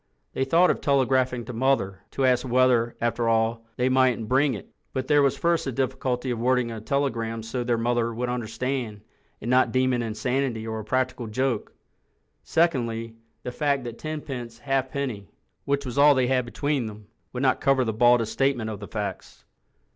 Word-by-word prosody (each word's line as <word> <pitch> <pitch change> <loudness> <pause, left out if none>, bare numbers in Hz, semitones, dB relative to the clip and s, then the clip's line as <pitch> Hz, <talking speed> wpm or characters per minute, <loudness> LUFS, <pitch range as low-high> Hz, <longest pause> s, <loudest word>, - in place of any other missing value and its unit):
They 135 - 0
thought 170 +6 +4
of - - -4
telegraphing 130 -3 +1
to 125 - -7
Mother, 115 -6 +1
to 135 - -1
ask 125 -1 +3
whether, 125 -2 +2
after 120 0 0
all, 115 0 +1
they 125 - +1
mightn't 130 -3 +2
bring 135 +2 +2
it—but 130 +6 -7
there 145 -1 +5
was 140 -2 +2
first 170 -1 +1
the 135 - -2
difficulty 130 0 -1
of 120 - -2
wording 125 0 +1
a 110 -1 -6
telegram 115 -3 -1
so 115 +3 -4
that 120 - -3
their 120 -1 +2
mother 120 0 0
would 120 +2 -3
understand 120 -1 -3 0.4
and 115 - -2
not 130 +1 +4
deem 130 0 +2
it 120 - 0
insanity 120 +1 -2
or 110 0 -4
a - - -6
practical 130 +1 -1
joke—secondly, 120 0 -2 0.3
the 125 - -4
fact 140 -1 0
that 120 -1 -7
ten 155 -1 -4
pence 120 -5 -7
half 135 +1 -1
penny, 125 -9 -4 0.4
which 140 0 0
was 125 +2 -3
all 145 0 +7
they 130 -1 +2
had 125 -1 +1
between 140 0 -1
them, 105 0 -10 0.3
would 125 +1 -3
not 130 -1 +2
cover 135 -2 +3
the 110 - -1
baldest 120 0 +3
statement 130 -5 0
of 105 - -6
the 100 - -8
facts. 105 -3 -6
125 Hz, 185 wpm, -25 LUFS, 115-135 Hz, 0.4 s, all